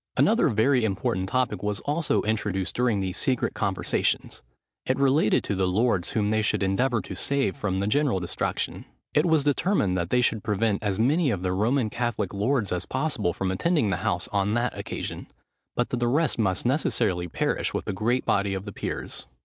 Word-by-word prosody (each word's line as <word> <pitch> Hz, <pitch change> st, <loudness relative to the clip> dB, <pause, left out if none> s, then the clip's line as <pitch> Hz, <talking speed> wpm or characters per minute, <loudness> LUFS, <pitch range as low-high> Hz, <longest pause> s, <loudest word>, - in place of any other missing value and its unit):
Another -, -, +4 dB
very 120 Hz, +3 st, +3 dB
important 95 Hz, -2 st, -1 dB
topic 130 Hz, +1 st, 0 dB
was 105 Hz, -1 st, -2 dB
also 150 Hz, +2 st, 0 dB
introduced 105 Hz, -3 st, -1 dB
during 120 Hz, -5 st, +1 dB
these 95 Hz, -1 st, -3 dB
secret 130 Hz, -3 st, 0 dB
conversations: 100 Hz, -3 st, -1 dB, 0.4 s
it 130 Hz, -, 0 dB
related 135 Hz, -4 st, +3 dB
to -, -, -2 dB
the 95 Hz, -1 st, +1 dB
lords 95 Hz, -1 st, +1 dB
whom 105 Hz, -1 st, +1 dB
they 110 Hz, 0 st, +2 dB
should 105 Hz, -, 0 dB
endeavour 115 Hz, +3 st, +1 dB
to -, -, -7 dB
save 135 Hz, +2 st, 0 dB
from 95 Hz, -2 st, -2 dB
the 100 Hz, -, 0 dB
general 130 Hz, -1 st, +2 dB
destruction. 90 Hz, -1 st, -3 dB, 0.3 s
It 150 Hz, +4 st, +3 dB
was 160 Hz, -3 st, +3 dB
determined 145 Hz, -, +1 dB
that 85 Hz, -1 st, -2 dB
they 125 Hz, -, +3 dB
should 115 Hz, -3 st, +1 dB
prevent 105 Hz, -1 st, 0 dB
as 100 Hz, -3 st, -1 dB
many 145 Hz, +7 st, +2 dB
of 100 Hz, -6 st, -2 dB
the 90 Hz, -1 st, 0 dB
Roman 110 Hz, +4 st, +1 dB
Catholic 115 Hz, -5 st, -2 dB
lords 105 Hz, +1 st, 0 dB
as 90 Hz, -1 st, -2 dB
possible 130 Hz, -, -1 dB
from 95 Hz, +1 st, -2 dB
attending 130 Hz, -, +1 dB
the 90 Hz, -, 0 dB
house 90 Hz, 0 st, -1 dB
on 100 Hz, +1 st, 0 dB
that 120 Hz, +1 st, 0 dB
occasion; -, -, -5 dB, 0.5 s
but 120 Hz, -, 0 dB
that 125 Hz, -, 0 dB
the 120 Hz, -, +1 dB
rest 150 Hz, +2 st, +1 dB
must 95 Hz, -2 st, 0 dB
necessarily 110 Hz, -, +1 dB
perish -, -, -1 dB
with -, -, -3 dB
the -, -, -2 dB
great 120 Hz, +6 st, 0 dB
body 100 Hz, -1 st, +1 dB
of 95 Hz, +1 st, -5 dB
the 100 Hz, -, -6 dB
peers. -, -, -5 dB
110 Hz, 195 wpm, -26 LUFS, 95-130 Hz, 0.5 s, Another